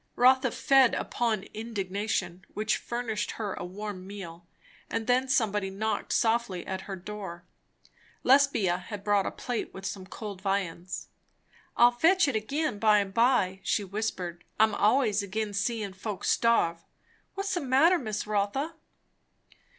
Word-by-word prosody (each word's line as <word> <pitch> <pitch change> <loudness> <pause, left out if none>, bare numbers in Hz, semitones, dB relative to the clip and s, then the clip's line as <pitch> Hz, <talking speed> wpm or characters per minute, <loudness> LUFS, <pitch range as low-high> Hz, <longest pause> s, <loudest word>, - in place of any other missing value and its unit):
Rotha 260 +1 +5
fed 265 +1 +4
upon 225 -5 -1
indignation, 205 -4 -3
which 215 +1 +1
furnished 230 -3 -3
her 210 -4 -3
a - - -6
warm 190 +1 -6
meal; 175 -4 -9 0.4
and 225 - -2
then 250 +2 +2
somebody 210 -6 +1
knocked 215 +3 -2
softly 225 -6 +1
at 190 +1 -5
her 195 - -3
door. 190 -2 -7 0.8
Lesbia 250 -10 +4
had 200 +2 -8
brought 205 -1 +2
a - - -2
plate 245 -2 -4
with 190 - -8
some 190 -1 -5
cold 200 -2 -7
viands. 185 -3 -3 0.7
"I'll 240 +1 +7
fetch 330 +8 +4
it 270 - -1
agin 275 +2 -1
by 215 -1 +5
and 200 -1 -1
by," 230 -6 +3
she 210 - 0
whispered. 185 -4 -4 0.2
"I'm 220 0 +5
allays 220 -1 +3
agin 205 +1 -3
seein' 205 -1 -1
folks 195 +1 -2
starve. 170 -8 +2 0.5
What's 395 +1 -2
the 355 - 0
matter, 285 +7 +4
Miss 215 -4 -3
Rotha?" 210 +10 -1
210 Hz, 145 wpm, -28 LUFS, 195-240 Hz, 0.8 s, I'll